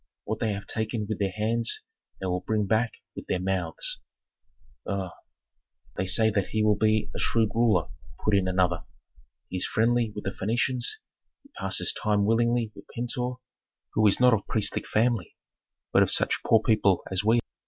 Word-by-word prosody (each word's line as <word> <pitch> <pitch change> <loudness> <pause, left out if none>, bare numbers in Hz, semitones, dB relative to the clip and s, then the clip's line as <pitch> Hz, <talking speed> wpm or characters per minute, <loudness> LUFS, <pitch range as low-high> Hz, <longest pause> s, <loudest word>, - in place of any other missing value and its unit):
What - - -3
they 110 -2 0
have 100 0 -6
taken 110 0 -2
with 110 - -3
their 100 -1 +1
hands 115 +4 -1 0.4
they 95 - -5
will 90 -1 -1
bring 105 +2 0
back 110 +4 +1 0.2
with - - -8
their 90 - 0
mouths." 90 -3 -1 0.9
"Uuu! 95 -2 -2 0.8
they 95 - -2
say 110 +3 +4
that 100 -3 0
he 110 -1 0
will 105 0 +4
be 110 -1 +1
a - - -4
shrewd 110 -2 +2
ruler," 110 -8 +2 0.4
put 105 - +2
in 95 -2 +2
another. 90 -2 +1 0.7
"He 95 - -3
is 90 - -1
friendly 115 0 +1
with 105 - -5
the 95 - -2
Phœnicians; 120 +5 -1 0.6
he - - -21
passes - - 0
time 105 -1 +1
willingly 115 0 +2
with - - -13
Pentuer, 125 +1 -2 0.6
who 110 0 +4
is 100 - +4
not 125 -1 +6
of 105 -3 -1
priestly 110 - 0
family, 115 -5 0 0.6
but - - +6
of - - +3
such - - +3
poor 115 -1 +4
people 105 -5 +3
as 95 +1 0
we. 115 +2 +4
110 Hz, 175 wpm, -27 LUFS, 95-115 Hz, 0.9 s, not